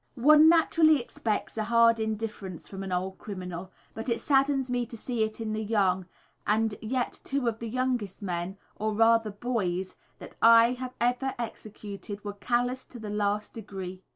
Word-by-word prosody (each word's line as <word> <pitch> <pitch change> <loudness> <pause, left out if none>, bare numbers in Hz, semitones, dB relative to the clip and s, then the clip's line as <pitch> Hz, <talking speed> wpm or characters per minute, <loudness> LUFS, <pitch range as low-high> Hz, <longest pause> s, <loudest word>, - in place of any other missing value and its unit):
_ - - -9
One 305 +2 +8
naturally 320 -2 +5
expects 225 -3 -3
a 215 - 0
hard 230 0 +5
indifference 215 -4 -4
from 195 -1 -7
an 195 -1 -5
old 185 +1 -2
criminal, 185 -2 -6 0.2
but 225 +3 -5
it 230 - 0
saddens 275 -1 +2
me 245 -1 0
to 235 - -9
see 240 +1 -3
it 220 +1 -3
in 220 -1 -3
the 220 0 -2
young, 190 -4 +1 0.4
and 220 +1 +2
yet 245 +2 -2
two 275 -3 -1
of 225 -1 -1
the 230 - -5
youngest 245 -5 -2
men 180 +1 -3 0.2
or 215 0 -2
rather, 225 0 +4
boys 200 -4 -2 0.2
that - - -11
I 230 +1 +7
have 255 0 -6
executed 220 -5 -3
were 205 - -3
callous 245 +4 -1
to 245 - -12
the 215 -2 -6
last 210 0 -1
degree. 190 -4 -7
220 Hz, 175 wpm, -28 LUFS, 200-245 Hz, 0.4 s, One